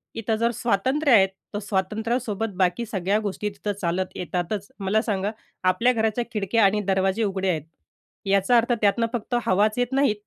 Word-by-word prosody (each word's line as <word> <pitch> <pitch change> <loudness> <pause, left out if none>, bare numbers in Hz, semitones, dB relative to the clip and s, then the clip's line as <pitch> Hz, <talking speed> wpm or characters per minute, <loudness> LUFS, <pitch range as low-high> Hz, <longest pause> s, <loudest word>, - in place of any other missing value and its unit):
इथं 225 0 -1
जर 230 +2 +1
स्वातंत्र्य 255 +6 +1
आहे, 195 -3 +7 0.3
तर 205 - -2
स्वातंत्र्यासोबत 215 +2 -2
बाकी 185 +5 +1
सगळ्या 200 0 0
गोष्टी 210 0 -3
तिथं 205 +1 -4
चालत 180 +2 -2
येतातच. 180 +3 -3
मला 200 +3 +1
सांगा, 205 -2 -1 0.3
आपल्या 205 +8 +3
घराच्या 220 +1 0
खिडक्या 210 +1 +1
आणि 210 +2 +2
दरवाजे 190 +3 +1
उघडे 190 -2 -1
आहेत, 155 -4 -1 0.6
याचा 195 +5 +3
अर्थ 235 +1 +2
त्यातून 210 +3 +3
फक्त 240 +1 -2
हवाच 210 +2 +2
येत 245 0 0
नाही, 275 -5 +3
210 Hz, 165 wpm, -24 LUFS, 190-230 Hz, 0.6 s, आहे